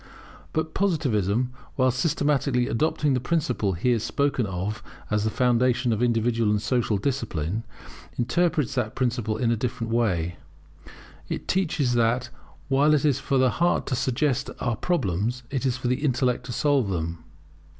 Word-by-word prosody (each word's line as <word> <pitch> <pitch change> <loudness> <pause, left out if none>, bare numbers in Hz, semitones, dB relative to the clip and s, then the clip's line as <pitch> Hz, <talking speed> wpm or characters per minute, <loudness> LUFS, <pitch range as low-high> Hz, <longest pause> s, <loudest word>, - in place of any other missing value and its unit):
But 160 0 -2
Positivism, 125 - +1 0.2
while 130 -1 +3
systematically 140 -2 +1
adopting 150 +2 +1
the 130 - +1
principle 135 - 0
here 115 +7 +1
spoken 135 0 0
of 95 +3 -3 0.3
as 105 0 +1
the - - +2
foundation 125 +1 +2
of 110 - -2
individual 115 -2 +2
and 105 0 +2
social 115 -1 0
discipline, 110 - -2 0.5
interprets 150 +4 +1
that 125 -3 -2
principle 120 -4 -1
in 115 0 +1
a - - +3
different 115 0 -3
way. 90 -8 0 0.9
It - - -4
teaches 155 -9 +1
that 120 +1 +1 0.4
while 145 +2 +4
it 150 - +1
is 140 -3 +2
for 140 - 0
the 130 -1 +4
heart 175 +1 +1
to 130 - -1
suggest 130 +1 0
our 120 -2 0
problems, 120 - -1
it 135 -1 0
is 125 -1 0
for 125 - -3
the 125 +4 0
intellect 125 -3 +1
to - - -5
solve 140 -5 +2
them. 85 -2 -3
125 Hz, 155 wpm, -25 LUFS, 110-140 Hz, 0.9 s, while